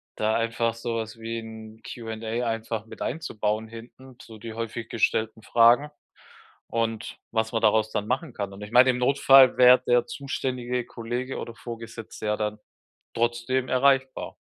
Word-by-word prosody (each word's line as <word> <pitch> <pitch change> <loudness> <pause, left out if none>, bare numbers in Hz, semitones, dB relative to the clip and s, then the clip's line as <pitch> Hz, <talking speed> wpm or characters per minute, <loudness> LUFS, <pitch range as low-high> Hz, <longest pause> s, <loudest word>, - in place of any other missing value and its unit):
da 110 0 0
einfach 115 0 0
sowas 115 -1 -4
wie 115 +1 -4
'n 110 0 -11
Q&A 115 +1 -4
einfach 115 -1 -3
mit - - -12
einzubauen 110 -7 -2
hinten, 120 +3 -13
so 110 - -12
die 115 +1 -7
häufig 115 0 -5
gestellten 110 0 0
Fragen 120 +7 +4 0.8
und 115 -1 -3
was 110 -1 0
man 115 - 0
daraus 110 0 +3
dann 105 -1 -2
machen 130 +3 -2
kann. 100 -3 -5
Und 100 - -11
ich 105 - -9
meine, 125 +2 +7
im 125 - -3
Notfall 135 0 +6
wär 125 0 +8
der 120 0 +2
zuständige 125 -2 -3
Kollege 120 +3 -5
oder 115 - -6
Vorgesetzte 115 -2 -8
ja 105 0 +1
dann 105 0 -3 0.5
trotzdem 120 +2 0
erreichbar. 130 0 +1
115 Hz, 155 wpm, -26 LUFS, 110-125 Hz, 0.8 s, wär